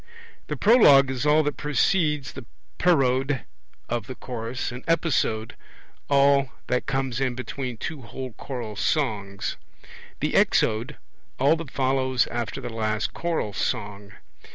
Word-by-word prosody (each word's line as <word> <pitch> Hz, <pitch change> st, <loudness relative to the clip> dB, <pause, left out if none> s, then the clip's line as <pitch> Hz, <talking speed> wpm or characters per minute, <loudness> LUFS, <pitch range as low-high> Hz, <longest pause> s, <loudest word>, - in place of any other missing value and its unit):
The -, -, -3 dB
Prologue 145 Hz, -, +6 dB
is 130 Hz, +2 st, -2 dB
all 155 Hz, +1 st, +5 dB
that 145 Hz, 0 st, -2 dB
precedes 150 Hz, -1 st, +1 dB
the 130 Hz, -, -9 dB, 0.3 s
Parode 135 Hz, -5 st, +2 dB, 0.5 s
of 120 Hz, -2 st, -3 dB
the 130 Hz, -, -6 dB
chorus; 120 Hz, +1 st, -5 dB
an 125 Hz, +1 st, -8 dB
Episode 150 Hz, -9 st, 0 dB, 0.5 s
all 140 Hz, -1 st, +4 dB, 0.2 s
that 125 Hz, -, -1 dB
comes 135 Hz, -2 st, -1 dB
in 130 Hz, -2 st, 0 dB
between 130 Hz, -1 st, -5 dB
two 155 Hz, +3 st, -5 dB
whole 130 Hz, +2 st, -7 dB
choral 120 Hz, -5 st, -6 dB
songs; 100 Hz, -7 st, -1 dB, 0.6 s
the -, -, -1 dB
Exode 115 Hz, +7 st, +2 dB, 0.4 s
all 140 Hz, +5 st, +4 dB
that 160 Hz, -3 st, -7 dB
follows 130 Hz, -1 st, +1 dB
after 120 Hz, -1 st, -3 dB
the 120 Hz, -, -6 dB
last 110 Hz, -1 st, -1 dB
choral 165 Hz, -11 st, -2 dB
song. 105 Hz, -1 st, -3 dB
130 Hz, 130 wpm, -25 LUFS, 115-145 Hz, 0.6 s, Prologue